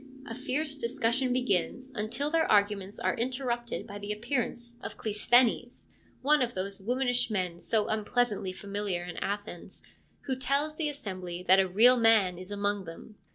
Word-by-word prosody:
A 230 - -6
fierce 280 +3 -2
discussion 250 +1 0
begins, 250 +1 0
until 235 +8 -1
their 325 0 +2
arguments 205 -1 +2
are - - 0
interrupted 240 -3 -2
by 205 -2 -8
the 205 +1 -5
appearance 240 +1 -3
of - - -7
Cleisthenes, 240 +3 +2 0.3
one 295 +1 +4
of 245 -1 -1
those 195 +1 -4
womanish 245 +3 +1
men 180 -5 -2
so 215 +3 0
unpleasantly 215 -2 0
familiar 200 -2 -3
in 175 -1 -7
Athens, 200 -3 -5 0.4
who 265 - -2
tells 280 +4 0
the 310 -2 -1
assembly 185 -10 -6
that 190 +1 +6
a 190 - +3
real 230 +7 +6
man 215 -6 +4
is 185 +1 -9
among 205 -1 -1
them. 165 +6 -10
225 Hz, 155 wpm, -29 LUFS, 200-255 Hz, 0.4 s, that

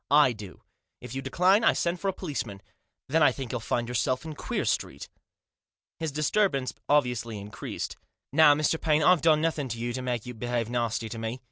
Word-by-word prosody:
"I 145 -3 +5
do. 105 -4 -11 0.4
If 125 -1 -9
you 135 - -3
decline 180 - +3
I - - +5
send 175 +1 -1
for 195 - -3
a - - +3
policeman. 125 - -5 0.4
Then 160 +4 +2
I 150 - +6
think 130 -4 -6
you'll 125 - -2
find 120 +2 -1
yourself 125 +4 -1
in 160 - -5
Queer - - -3
Street." - - -2 0.9
His 160 -2 -2
disturbance 150 -2 +1 0.2
obviously 125 -6 +1
increased. 100 -1 -6 0.2
" - - -55
Now, 150 -1 +7
Mr. 155 +2 0
Paine, 155 -1 +2
I've 180 0 +5
done 155 -2 +4
nothing 155 -4 0
to 115 -2 -5
you 120 +1 -3
to 130 - -3
make 125 -3 -2
you 125 - -6
behave 120 0 -2
nasty 115 -2 -1
to 115 - -6
me. 115 +3 -4
130 Hz, 205 wpm, -27 LUFS, 120-155 Hz, 0.9 s, Now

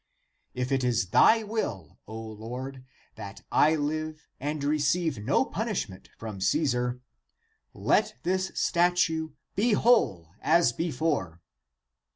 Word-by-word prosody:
If 125 +1 -2
it 135 -1 +1
is 120 -7 +1
thy 225 - +6
will, 160 - -4
O 110 +1 -7
Lord, 120 +5 -7 0.3
that 100 0 -9
I 155 +2 +4
live 155 +1 -3
and 145 +1 -3
receive 150 0 +1
no 140 - +2
punishment 205 - -4
from 110 -4 -7
Caesar, 125 +1 0 0.7
let - - +1
this 185 +2 0
statue 170 -3 +1 0.2
be 215 +3 +2
whole 95 - +3
as 160 -6 +4
before." 145 - -1
145 Hz, 115 wpm, -28 LUFS, 115-165 Hz, 0.7 s, thy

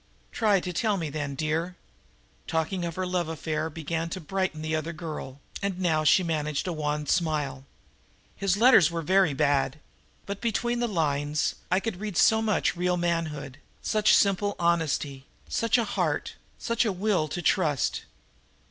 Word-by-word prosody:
"Try 210 -4 +3
to 180 0 -4
tell 210 +3 +1
me 160 -5 -3
then, 145 -2 -3
dear." 160 +4 -1 0.7
Talking 165 +3 -1
of 170 -1 -4
her 185 - -2
love 180 -2 -1
affair 160 -1 -2
began 165 +1 -3
to 185 - -4
brighten 185 -2 -2
the 155 0 -1
other 155 +2 -3
girl, 155 -4 -7 0.2
and 200 -2 -2
now 160 -4 +1
she 185 +4 +5
managed 150 -3 -1
a 180 - -1
wan 150 -1 -2
smile. 145 -5 -1 0.7
"His 195 -1 0
letters 225 - +7
were 170 -1 -3
very 185 -3 +3
bad. 140 -1 +1 0.5
But, 200 0 -5
between 240 +1 0
the 240 - +1
lines, 150 -6 0 0.2
I 185 +1 +3
could 195 -3 -4
read 205 -4 -4
so 220 0 +5
much 215 -4 +1
real 180 +1 0
manhood, 160 -5 -2 0.2
such 215 -1 +4
simple 200 0 +2
honesty, 155 -5 0 0.2
such 230 +1 +1
a 235 - +2
heart, - - -1 0.2
such 230 0 0
a 220 - +1
will 185 -4 0
to 175 +4 -4
trust! 150 -7 +1
170 Hz, 165 wpm, -27 LUFS, 155-195 Hz, 0.7 s, letters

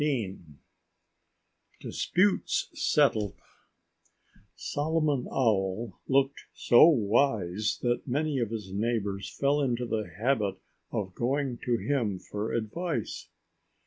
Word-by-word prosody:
XV 120 -10 -1 1.4
Disputes 195 +2 +1
Settled 105 -2 +2 1.2
Solomon 150 -3 0
Owl 105 -3 0
looked 135 +1 +1
so 120 +6 +7
wise 110 - +2
that 120 +2 0
many 145 +2 0
of 115 -3 -1
his 105 -4 -6
neighbors 100 -3 -1
fell 140 +1 +1
into 125 -3 0
the 110 -4 -2
habit 105 -4 +1 0.4
of 95 -3 -3
going 130 +2 -1
to 120 -1 +2
him 115 -8 -1
for 105 +4 -5
advice. 120 - -3
120 Hz, 100 wpm, -28 LUFS, 105-140 Hz, 1.4 s, so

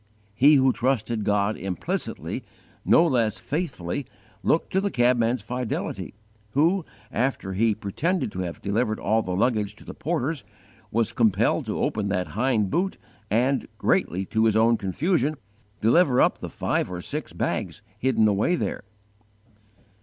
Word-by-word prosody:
_ - - -34 0.3
He 140 +8 +6
who 130 -2 +4
trusted 120 -3 0
God 105 +1 +1
implicitly, 95 -2 -4 0.4
no 165 - +5
less 120 -8 +1
faithfully 140 - -3 0.3
looked 160 - +1
to 190 - +3
the 200 - 0
cabman's 120 - +2
fidelity, 125 -3 -4 0.4
who, 170 +6 +3 0.3
after 115 -5 -1
he 110 +2 +2
pretended 130 - -1
to 95 - -6
have 90 -2 -5
delivered 110 +2 0
all 110 +1 +2
the 90 -3 -3
luggage 105 -1 +1
to - - -16
the - - -7
porters, 155 -3 -2 0.5
was 115 0 0
compelled 110 -5 +2
to - - -2
open 105 -2 0
that 90 -2 -1
hind 110 -3 +1
boot 190 +3 0 0.3
and, 125 +5 +1
greatly 95 +3 +1
to 110 +4 +1
his 110 -2 +3
own 115 +1 +5
confusion, 150 - 0 0.5
deliver 125 +3 +4
up - - +3
the - - -6
five - - -1
or 90 -1 -5
six - - -5
bags 110 - -3 0.2
hidden 120 -3 +3
away 105 - +2
there. - - -3
115 Hz, 150 wpm, -25 LUFS, 105-135 Hz, 0.5 s, He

